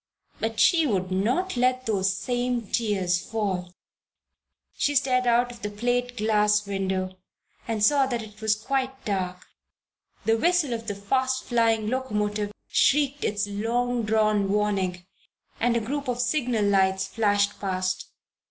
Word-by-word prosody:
But 225 0 -2
she 330 +2 +5
would 185 -5 -1
not 245 - 0
let 255 +1 +1
those 195 -3 +1
same 245 -1 -1
tears 195 -5 0
fall! 195 -5 -3 1.0
She 290 - 0
stared 255 -2 +2
out 240 +1 +3
of 235 -1 -13
the 210 - -3
plate 245 +3 -1
glass 210 -1 +2
window 190 -1 -2 0.5
and 220 -2 -1
saw 275 +2 +4
that 240 -3 -2
it 215 0 -13
was 215 -1 +1
now - - -18
quite 265 -1 -2
dark. 185 -3 -3 0.8
The 225 0 +3
whistle 340 -4 +2
of 225 -1 -5
the 205 - -2
fast 260 +6 0
flying 225 -3 +1
locomotive 210 -4 -1 0.2
shrieked 285 0 +2
its 205 0 0
long 235 +4 -1
drawn 215 -2 +2
warning, 195 -3 0 0.5
and 235 0 +2
a - - +2
group 275 +5 -4
of 245 -1 -2
signal 245 -4 +1
lights 190 -1 +2
flashed 205 0 +1
past. 185 -1 -2
220 Hz, 145 wpm, -25 LUFS, 200-245 Hz, 1.0 s, she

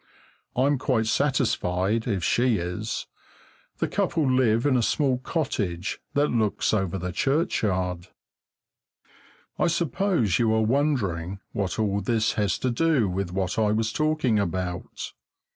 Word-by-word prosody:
I'm 135 +2 +2
quite 120 -4 +1
satisfied, 110 -5 +1
if 100 -6 -1
she 120 +2 +2
is! 90 +6 -3 0.7
The - - 0
couple 155 -4 0
live 125 -2 +3
in 140 -3 +3
a 125 - +3
small 130 +1 +1
cottage 105 - -2 0.2
that 145 +1 +3
looks 110 -3 +1
over 95 -3 0
the 90 0 -4
churchyard. 95 - 0 1.5
I - - +3
suppose 165 - +1
you 115 -2 +3
are 110 - +2
wondering 105 - 0
what 95 -3 -2
all 100 -2 0
this 110 -2 +1
has 100 -4 0
to 130 - +2
do 140 -3 +2
with 95 0 -2
what 95 +2 -1
I 105 -1 +3
was 110 +1 0
talking 155 -8 +1
about. 90 -2 -3
110 Hz, 135 wpm, -25 LUFS, 95-130 Hz, 1.5 s, live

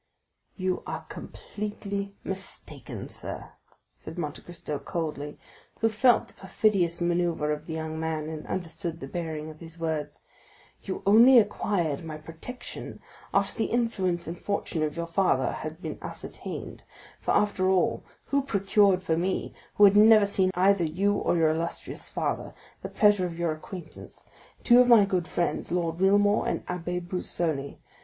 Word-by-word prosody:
"You 185 -1 -1
are - - -5
completely 200 -1 -5
mistaken, 190 0 -6
sir," - - -4 0.4
said 160 - -10
Monte 150 -4 -4
Cristo 165 -4 -6
coldly, 150 -4 -4 0.4
who 225 - +3
felt 240 +2 +4
the - - -14
perfidious 190 -3 +1
manœuvre 170 -3 +1
of 150 +1 -7
the 160 - -4
young 160 0 -4
man, 160 -1 -2
and 155 -1 -6
understood 165 -1 -4
the - - -6
bearing 160 -3 -4
of 155 - -15
his 165 0 -8
words; 160 -3 -3 0.6
"you 190 - -5
only 230 +6 +8
acquired 185 -8 +1
my 155 -2 -6
protection 165 +11 -8 0.3
after 200 0 +1
the 225 - 0
influence 190 -8 0
and 170 +2 -6
fortune 200 -5 -2
of 155 +1 -1
your 170 - -1
father 165 -6 +2
had 160 +4 -6
been - - -5
ascertained; - - -7 0.4
for, - - 0
after 190 -3 +2
all, 190 -1 +2 0.2
who 280 0 +1
procured 200 -6 +3
for 165 -3 +1
me, 180 +3 -1 0.2
who 210 - +4
had 200 0 +8
never 215 0 +8
seen 195 -2 +2
either 190 0 +4
you 185 +6 +1
or 200 - +1
your 160 -1 +4
illustrious 165 +2 -4
father, - - -3 0.3
the - - -5
pleasure 205 -3 +4
of 165 -1 -8
your 170 -1 0
acquaintance?—two 180 +8 -2
of 250 - +6
my 225 -4 +8
good 185 -3 -1
friends, 175 - -1
Lord 170 -1 -1
Wilmore 205 +2 +4
and - - -1
the - - -3
Abbé 180 0 -4
Busoni. 160 -5 -2
180 Hz, 155 wpm, -27 LUFS, 160-200 Hz, 0.6 s, only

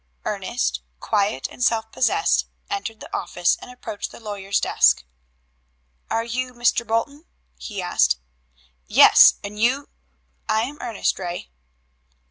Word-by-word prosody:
Ernest, 65 0 -2 0.2
quiet 200 -10 0
and 250 - -5
self 225 -2 +1
possessed, 410 +10 +2 0.2
entered 230 - -4
the - - -6
office 175 0 +1
and - - -10
approached 250 -4 -6
the - - -13
lawyer's 200 -3 -2
desk. - - +3 1.1
"Are 225 - 0
you 250 +2 -3
Mr. 240 -1 +1
Bolton?" 280 +8 -2 0.3
he 205 -4 -6
asked. 65 - +2 0.7
"Yes, - - +8
and 205 +1 -7
you 260 +5 +1 0.3
" - - -42
"I 220 +1 +2
am 285 +5 -6
Ernest 230 -4 -1
Ray." 175 - -6
225 Hz, 130 wpm, -22 LUFS, 200-250 Hz, 1.1 s, Yes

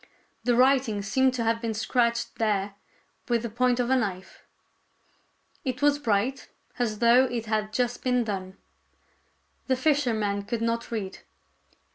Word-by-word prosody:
The 245 -1 +3
writing 255 -5 +3
seemed 260 +5 +2
to 235 - -1
have 230 0 0
been 225 -2 -2
scratched 235 +1 0
there 205 -3 0 0.6
with 235 -1 +1
the 235 - -4
point 250 +1 +1
of 245 +1 0
a - - +5
knife. 195 -6 -3 1.2
It 260 +1 -3
was 290 0 +4
bright, 235 +1 -1 0.3
as 220 -3 0
though 240 +3 +5
it 240 -3 -3
had 215 -1 -1
just 245 +2 -1
been 250 -1 +2
done. 190 -3 -5 1.1
The 260 - +2
fisherman 240 -8 +1
could 230 +2 -3
not 230 0 -1
read. 205 -5 -4
235 Hz, 145 wpm, -26 LUFS, 215-250 Hz, 1.2 s, a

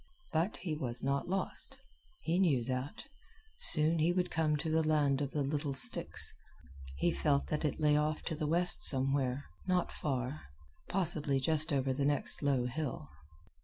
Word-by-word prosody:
But 165 +6 -1
he 175 -3 -5
was 125 -5 -3
not 140 +4 -2
lost. 190 +1 -4 0.4
He 170 +3 -1
knew 145 -10 +2
that. 130 +3 -5 0.6
Soon 160 - +4
he 160 +3 +2
would 180 0 -2
come 155 -2 0
to 160 +2 -4
the 160 0 +2
land 150 -3 +1
of 140 - -2
the 145 0 -2
little 140 0 -3
sticks. - - +5 0.6
He 175 - +1
felt 140 -4 -1
that 150 - -2
it 150 - -2
lay 150 -1 +2
off 150 +1 -1
to 160 - -4
the 150 0 -3
left 175 +3 0
somewhere, 135 0 +2 0.2
not 180 -1 0
far 135 0 -4 0.5
possibly 155 -7 0
just 155 +3 +1
over 135 -1 0
the 140 +2 -3
next 145 0 +1
low 135 -4 0
hill. 125 - -5
150 Hz, 165 wpm, -32 LUFS, 135-160 Hz, 0.6 s, sticks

